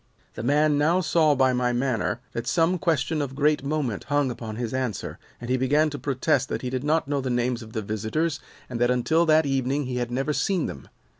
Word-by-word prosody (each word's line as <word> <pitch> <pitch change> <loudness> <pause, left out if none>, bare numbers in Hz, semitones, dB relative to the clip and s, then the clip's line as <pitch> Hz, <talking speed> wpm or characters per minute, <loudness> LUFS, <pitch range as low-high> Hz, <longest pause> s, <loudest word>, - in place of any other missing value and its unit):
"The - - -6
man 145 +4 +2
now 165 +5 +3
saw 155 -3 +3
by 130 -1 +3
my 125 0 +1
manner 120 -1 -1
that 115 +1 -5
some 170 +5 +2
question 160 -3 0
of 135 -2 -4
great 150 0 +2
moment 140 -8 -2
hung 145 -2 +1
upon 115 -2 -6
his 115 0 -4
answer, 130 -6 -3 0.2
and 120 - -7
he 130 +1 +1
began 145 +4 +2
to 145 - -5
protest 135 0 0
that - - -3
he 125 - -3
did 130 0 -2
not 155 0 +1
know 140 -1 0
the 130 - -3
names 120 0 0
of 110 -1 -11
the 110 - -3
visitors 110 +10 -2 0.3
and 120 -2 -5
that 120 - +4
until 160 +7 +2
that 155 0 +5
evening 135 +1 0
he 125 -1 -3
had 120 -1 -2
never 135 +5 -1
seen 185 +1 0
them. 70 - -7
135 Hz, 225 wpm, -25 LUFS, 125-150 Hz, 0.3 s, that